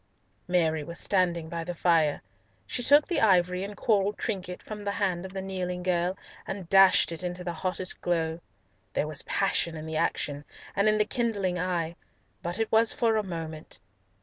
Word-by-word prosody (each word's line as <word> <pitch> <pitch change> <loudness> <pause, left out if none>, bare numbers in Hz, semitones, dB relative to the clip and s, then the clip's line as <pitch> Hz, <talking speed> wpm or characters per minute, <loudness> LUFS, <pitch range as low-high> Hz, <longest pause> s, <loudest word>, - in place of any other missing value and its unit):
Mary 160 -4 +1
was 170 +3 -5
standing 175 -4 +1
by 165 0 -4
the 175 +1 -5
fire. 165 -3 +2 0.4
She - - -3
took 290 +4 +5
the 335 -6 0
ivory 180 -3 +3
and 200 0 -7
coral 205 -3 +2
trinket 185 -5 -4
from 210 -1 -7
the 200 0 -1
hand 190 -3 -1
of 190 - -14
the 190 -1 -4
kneeling 180 -2 -3
girl, 180 +1 0 0.3
and 195 -3 -5
dashed 195 -1 +6
it 165 - -5
into 180 0 -4
the 175 -1 -3
hottest 185 +2 -3
glow. 165 -2 0 0.6
There - - +1
was 150 -2 0
passion 170 -4 0
in 155 - -7
the 160 0 -3
action, 145 -1 -1 0.3
and 200 +2 +4
in 215 - +3
the 210 - +3
kindling 205 -6 -1
eye, 170 -2 -1 0.5
but 175 +2 -3
it 225 -1 -1
was 225 0 +5
but - - -15
for 225 -2 +3
a 215 - +2
moment. 165 -5 -6
180 Hz, 190 wpm, -28 LUFS, 170-200 Hz, 0.6 s, dashed